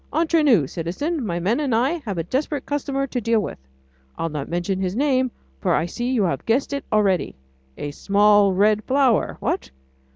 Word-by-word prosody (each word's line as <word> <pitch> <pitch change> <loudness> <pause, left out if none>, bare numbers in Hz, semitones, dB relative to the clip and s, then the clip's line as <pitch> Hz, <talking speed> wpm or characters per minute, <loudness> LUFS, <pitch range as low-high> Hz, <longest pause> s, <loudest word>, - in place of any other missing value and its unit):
Entre 325 +1 +2
nous, 235 - +4
citizen, 215 - -3
my 175 -5 -2
men 205 - 0
and 275 -6 0
I 275 +9 +1
have 200 -4 -3
a 165 - -1
desperate 275 - -2
customer 275 -1 -2
to 250 -2 -3
deal 230 0 +2
with. 205 - -5 0.6
I'll 165 - -2
not 150 -3 -5
mention 175 +3 -2
his 185 0 -2
name, 260 -1 +2 0.3
for - - +1
I 160 - +1
see 240 +8 -3
you 250 -5 +1
have 175 - -1
guessed 255 +5 +1
it 280 - -3
already. 200 -4 +1 0.4
A 145 - -4
small 205 +4 +4
red 210 +3 +2
flower, 265 -4 +2
what?... - - -2
220 Hz, 190 wpm, -22 LUFS, 185-275 Hz, 0.6 s, nous